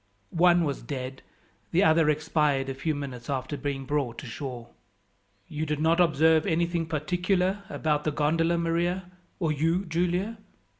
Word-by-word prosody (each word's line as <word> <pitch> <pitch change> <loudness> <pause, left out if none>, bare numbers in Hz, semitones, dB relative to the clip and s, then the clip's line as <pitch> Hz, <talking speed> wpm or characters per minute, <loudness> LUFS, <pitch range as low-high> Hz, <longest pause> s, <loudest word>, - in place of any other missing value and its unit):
One 175 0 +5
was 145 -3 -2
dead; 130 +1 -6 0.5
the 180 +4 +3
other 160 -2 +4
expired 150 -3 +1
a - - -2
few 145 +4 -2
minutes 130 -4 -6
after 135 +1 -2
being 140 -1 -4
brought 135 -4 -2
ashore. 125 -2 -6 0.8
"You 150 0 -4
did 150 -1 -2
not 165 +2 +3
observe 160 -1 +4
anything 170 -1 0
particular 180 +5 0
about 150 -1 0
the 155 - 0
gondola, 165 +3 +1
Maria, 175 +2 -1 0.3
or 165 -4 +1
you, 165 +6 +1
Giulia?" 180 +6 -1
155 Hz, 145 wpm, -27 LUFS, 145-170 Hz, 0.8 s, One